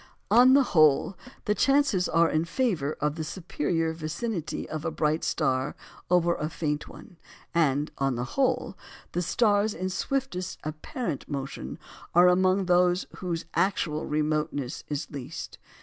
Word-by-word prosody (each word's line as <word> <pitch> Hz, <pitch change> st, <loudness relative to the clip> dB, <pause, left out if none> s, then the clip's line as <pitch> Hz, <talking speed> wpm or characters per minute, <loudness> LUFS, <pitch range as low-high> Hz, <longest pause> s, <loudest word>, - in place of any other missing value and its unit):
On 255 Hz, +2 st, +7 dB
the 280 Hz, -, +6 dB
whole, 155 Hz, -, +4 dB, 0.3 s
the 210 Hz, -, +2 dB
chances 270 Hz, -7 st, +2 dB
are 165 Hz, 0 st, +4 dB
in 155 Hz, 0 st, +1 dB
favour 170 Hz, -, 0 dB
of 150 Hz, 0 st, +1 dB
the 160 Hz, 0 st, -4 dB
superior 165 Hz, -1 st, -2 dB
vicinity 165 Hz, +3 st, -4 dB
of 155 Hz, -1 st, -5 dB
a -, -, 0 dB
bright 155 Hz, 0 st, 0 dB
star 130 Hz, +2 st, 0 dB, 0.3 s
over 175 Hz, -1 st, +3 dB
a 155 Hz, -2 st, -3 dB
faint 150 Hz, -2 st, -2 dB
one; 175 Hz, -, -13 dB, 0.4 s
and, 150 Hz, -3 st, +2 dB
on 135 Hz, -2 st, +1 dB
the 120 Hz, -, -2 dB
whole, 270 Hz, -2 st, 0 dB, 0.4 s
the 175 Hz, -, -1 dB
stars 205 Hz, +2 st, +2 dB
in 185 Hz, +3 st, -3 dB
swiftest 195 Hz, -2 st, -2 dB
apparent 155 Hz, -, -5 dB
motion 135 Hz, -, -5 dB, 0.4 s
are 175 Hz, +1 st, +7 dB
amongst 185 Hz, +1 st, +3 dB
those 180 Hz, 0 st, +3 dB
whose 170 Hz, -3 st, -3 dB
actual 170 Hz, -4 st, 0 dB
remoteness 150 Hz, -3 st, -1 dB
is 145 Hz, -2 st, -3 dB
least. 140 Hz, -4 st, -7 dB
165 Hz, 145 wpm, -27 LUFS, 150-190 Hz, 0.4 s, On